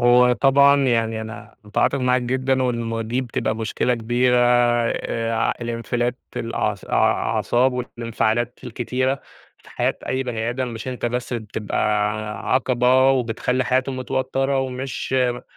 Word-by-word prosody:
هو 125 Hz, 0 st, +5 dB
طبعًا 140 Hz, +2 st, +5 dB
يعني 115 Hz, -2 st, +1 dB
أنا 110 Hz, 0 st, -9 dB
متعاطف 105 Hz, +6 st, +1 dB
معاك 125 Hz, -1 st, +2 dB
جدًا، 130 Hz, +1 st, 0 dB
والموا 115 Hz, -2 st, -1 dB
دي 120 Hz, +3 st, -1 dB
بتبقى 115 Hz, -3 st, -2 dB
مشكلة 115 Hz, +2 st, 0 dB
كبيرة، 120 Hz, +2 st, +1 dB
آآ 120 Hz, -1 st, +2 dB
ع 115 Hz, +1 st, +1 dB
الانفلات 120 Hz, +1 st, -2 dB, 0.2 s
الأع 115 Hz, -1 st, -1 dB
أع -, -, -9 dB
أع -, -, +2 dB
أعصاب 125 Hz, +2 st, +2 dB
والانفعالات 120 Hz, -1 st, -2 dB
الكتيرة 130 Hz, +2 st, -2 dB, 0.4 s
في -, -, -19 dB
حياة -, -, -1 dB
أي 130 Hz, 0 st, -1 dB
بني 115 Hz, -3 st, -2 dB
آدم، 125 Hz, +1 st, -2 dB
مش 115 Hz, +1 st, -6 dB
أنت 125 Hz, -1 st, -3 dB
بس 125 Hz, +1 st, -3 dB
اللي 115 Hz, -2 st, -3 dB
بتبقى 105 Hz, 0 st, -4 dB, 0.8 s
عقبة 130 Hz, +1 st, +3 dB
وبتخلّي 125 Hz, 0 st, 0 dB
حياته 130 Hz, +2 st, +1 dB
متوترة 130 Hz, +1 st, -1 dB
ومش 130 Hz, 0 st, -4 dB
ما 125 Hz, -2 st, +1 dB
125 Hz, 145 wpm, -22 LUFS, 115-130 Hz, 0.8 s, هو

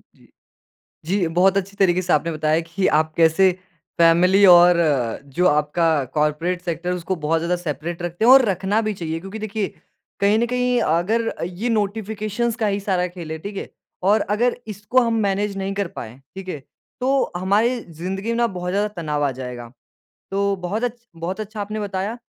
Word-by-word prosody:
जी। -, -, -23 dB, 0.8 s
जी 185 Hz, +1 st, +1 dB
बहुत 190 Hz, +1 st, +4 dB
अच्छी 200 Hz, 0 st, -2 dB
तरीक़े 185 Hz, -2 st, +2 dB
से 175 Hz, -, 0 dB
आपने 165 Hz, +3 st, +1 dB
बताया 155 Hz, +1 st, +1 dB
कि 165 Hz, +3 st, -2 dB
आप 155 Hz, 0 st, -3 dB
कैसे 165 Hz, +3 st, +5 dB, 0.5 s
फ़ैमिली 175 Hz, +4 st, +5 dB
और 175 Hz, -1 st, +8 dB, 0.6 s
जो 180 Hz, -, +4 dB
आपका 150 Hz, +1 st, +2 dB, 0.3 s
कॉर्पोरेट 155 Hz, +4 st, 0 dB
सेक्टर 170 Hz, 0 st, -4 dB
है -, -, 0 dB
उसको 180 Hz, +2 st, -3 dB
बहुत 165 Hz, +2 st, +2 dB
ज़्यादा 170 Hz, +2 st, 0 dB
सेपरेट 165 Hz, +2 st, -4 dB
रखते 175 Hz, +4 st, -2 dB
हैं 240 Hz, -, +6 dB
और 265 Hz, -1 st, +8 dB
रखना 195 Hz, +3 st, 0 dB
भी 215 Hz, -1 st, -2 dB
चाहिए 165 Hz, -3 st, -4 dB
क्योंकि 195 Hz, +4 st, -8 dB
देखिए 215 Hz, -1 st, -3 dB, 0.5 s
कहीं 200 Hz, +2 st, +3 dB
न 235 Hz, -, +2 dB
कहीं 250 Hz, 0 st, +1 dB
अगर 205 Hz, +9 st, +1 dB
ये 185 Hz, +7 st, -4 dB
नोटिफिकेशंस 215 Hz, +1 st, -1 dB
का 225 Hz, -3 st, 0 dB
ही 200 Hz, 0 st, 0 dB
सारा 185 Hz, -3 st, 0 dB
खेल 175 Hz, -3 st, -9 dB
है, 160 Hz, -, -5 dB
ठीक 200 Hz, +5 st, -8 dB
है? -, -, -5 dB, 0.3 s
और 205 Hz, +4 st, +4 dB
अगर 240 Hz, +4 st, +1 dB
इसको 210 Hz, +4 st, 0 dB
हम 230 Hz, -1 st, 0 dB
मैनेज 200 Hz, 0 st, -1 dB
नहीं 195 Hz, 0 st, -3 dB
कर 200 Hz, -2 st, -2 dB
पाए, 120 Hz, -5 st, -9 dB, 0.2 s
ठीक 190 Hz, -1 st, -8 dB
है? 170 Hz, -, -4 dB, 0.4 s
तो 265 Hz, +2 st, +1 dB
हमारी 210 Hz, +7 st, +1 dB
ज़िंदगी 185 Hz, +4 st, -6 dB
में -, -, 0 dB
ना 240 Hz, -, +3 dB
बहुत 180 Hz, -4 st, -4 dB
ज़्यादा 205 Hz, +2 st, +1 dB
तनाव 150 Hz, -3 st, -1 dB
आ 140 Hz, -, +1 dB
जाएगा। 125 Hz, -2 st, -7 dB, 0.6 s
तो 200 Hz, 0 st, +1 dB
बहुत 190 Hz, +5 st, -4 dB
अच 240 Hz, -1 st, -4 dB
बहुत 170 Hz, +5 st, -5 dB
अच्छा 215 Hz, 0 st, -6 dB
आपने 210 Hz, +2 st, -4 dB
बताया। 205 Hz, +2 st, -3 dB
190 Hz, 190 wpm, -21 LUFS, 170-210 Hz, 0.8 s, और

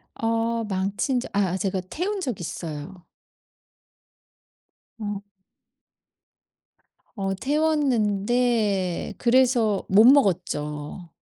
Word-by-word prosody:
어 230 Hz, 0 st, -1 dB
망친 205 Hz, +5 st, -1 dB
적 -, -, -6 dB
아 190 Hz, -2 st, +1 dB
제가 190 Hz, -1 st, -1 dB
태운 390 Hz, +4 st, -3 dB
적 250 Hz, -, -3 dB
있어요. 165 Hz, +1 st, -7 dB, 1.9 s
어. 205 Hz, -2 st, -5 dB, 1.9 s
어 195 Hz, -1 st, -1 dB
태웠는데 235 Hz, -, 0 dB
그래서 240 Hz, -4 st, +2 dB
못 200 Hz, +3 st, +6 dB
먹었죠. 175 Hz, -, +2 dB
205 Hz, 140 characters per minute, -24 LUFS, 190-245 Hz, 1.9 s, 못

